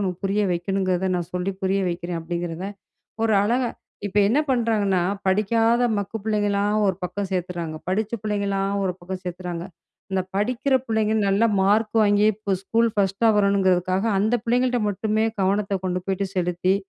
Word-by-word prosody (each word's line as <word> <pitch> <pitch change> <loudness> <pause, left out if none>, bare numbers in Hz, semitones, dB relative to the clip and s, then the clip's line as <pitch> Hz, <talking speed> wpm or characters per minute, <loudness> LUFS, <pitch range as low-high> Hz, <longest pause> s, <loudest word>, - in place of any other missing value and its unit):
உனக்கு 185 -3 -2
புரிய 200 +2 +1
வைக்கணுங்கிறத 185 +1 0
நான் 175 0 -4
சொல்லி 180 +2 -1
புரிய 195 +1 +1
வைக்கிறேன்." 175 0 -3
அப்படிங்கிறத 175 +1 -4 0.6
ஒரு 225 - +2
அழகா 240 +2 +1 0.4
இப்ப 205 +1 -1
என்ன 275 +7 +3
பண்ணுறாங்கன்னா 220 -6 +2 0.3
படிக்காத 225 +5 +2
மக்கு 205 +2 -3
பிள்ளைங்களலாம் 205 -1 +1
ஒரு 190 - +2
பக்கம் 190 +2 -3
சேர்த்துடுறாங்க. 175 -3 -3
படித்த 210 +3 -1
பிள்ளைங்களலாம் 200 -2 -1
ஒரு 185 - 0
பக்கம் 185 +1 -6
சேர்த்துறாங்க. 175 -1 -5 0.5
இந்த 190 -1 +1
படிக்கிற 250 +6 0
பிள்ளைங்க 220 -1 +1
நல்லா 200 +4 +3 0.2
மார்க் 215 +3 +2
வாங்கி 205 0 +3
இப்போ 200 -1 -3
ஸ்கூல் 230 +4 +2
ஃபர்ஸ்ட்டா 200 +2 +2
வரணுங்கிறதுக்காக 190 -2 +2
அந்த 215 +4 +2
பிள்ளைங்கள்ட்ட 245 +1 +1
மட்டுமே 215 +2 0 0.2
கவனத்தை 195 +1 +1
கொண்டு 180 0 -1
போய்ட்டு 195 +1 -1
செலுத்தி 180 +1 +1
195 Hz, 145 wpm, -23 LUFS, 185-215 Hz, 0.6 s, என்ன